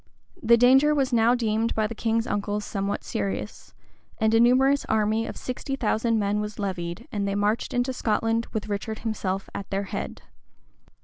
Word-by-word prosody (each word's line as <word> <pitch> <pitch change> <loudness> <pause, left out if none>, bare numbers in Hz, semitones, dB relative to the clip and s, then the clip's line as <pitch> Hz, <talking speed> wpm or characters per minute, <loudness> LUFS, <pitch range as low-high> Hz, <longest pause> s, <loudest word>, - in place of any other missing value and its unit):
The 235 -1 +5
danger 265 +5 +5
was 270 -3 0
now 235 +1 +4
deemed 225 -1 0
by 220 - +1
the 220 - -3
king's 225 0 0
uncles 205 -1 -2
somewhat 200 0 -3
serious; 100 +1 -4 0.4
and 220 0 +2
a 225 - +5
numerous 265 +4 +4
army 220 +1 +1
of - - -7
sixty 255 +2 -4
thousand 230 -2 +1
men 205 0 0
was 210 0 -5
levied, 175 -4 -4
and 200 -1 -2
they 200 - -1
marched 205 +2 0
into 245 +1 0
Scotland 225 -1 0
with 215 -1 -3
Richard 215 +1 -3
himself 195 -3 -2
at 200 - -6
their 195 +1 -1
head. - - -5
220 Hz, 175 wpm, -25 LUFS, 205-235 Hz, 0.4 s, The